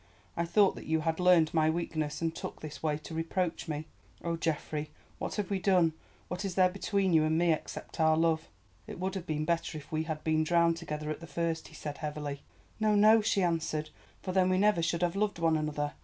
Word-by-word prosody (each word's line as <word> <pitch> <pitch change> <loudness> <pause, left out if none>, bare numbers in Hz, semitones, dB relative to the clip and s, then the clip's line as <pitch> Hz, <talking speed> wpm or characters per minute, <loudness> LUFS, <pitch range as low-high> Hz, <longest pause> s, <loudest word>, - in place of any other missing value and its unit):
I 170 - 0
thought 200 +3 +4
that - - -9
you 160 0 +1
had 160 +1 -1
learned 180 -3 +5
my 155 -1 +3
weakness 160 -2 -2
and 165 -1 0
took - - -6
this 150 -2 -8
way 150 -2 0
to 155 +2 -10
reproach 165 +2 -2
me. 155 0 -3 0.4
Oh, 170 0 -1
Geoffrey, 155 -2 -2 0.3
what - - -3
have 210 -2 -3
we 195 - +1
done? 180 -4 +3 0.3
What 180 +2 -4
is 190 -3 -3
there 185 -1 +5
between 195 -1 0
you 160 -1 +5
and 155 +1 +2
me—except 170 -1 -1
our 160 0 +4
love?" 165 -1 +1 0.4
"It - - -8
would 190 +1 -2
have 185 -2 -5
been 155 -1 -1
better 170 -1 -1
if 145 -1 -11
we 160 0 -1
had 155 -1 -4
been 155 0 +2
drowned 170 0 +3
together 150 -1 -4
at - - -4
the 165 - -10
first," 165 -1 -2
he - - -15
said 145 -2 -6
heavily. 150 -2 -4 0.4
"No, 215 -1 +3
no," 215 +2 +6
she 205 -2 +1
answered, 160 -3 -1 0.3
"for 185 - -2
then 185 0 +3
we 185 - +2
never 205 -2 +3
should 170 +1 0
have 175 +1 +1
loved 205 -1 0
one 165 -1 +2
another. 150 -1 -2
165 Hz, 225 wpm, -31 LUFS, 155-180 Hz, 0.4 s, no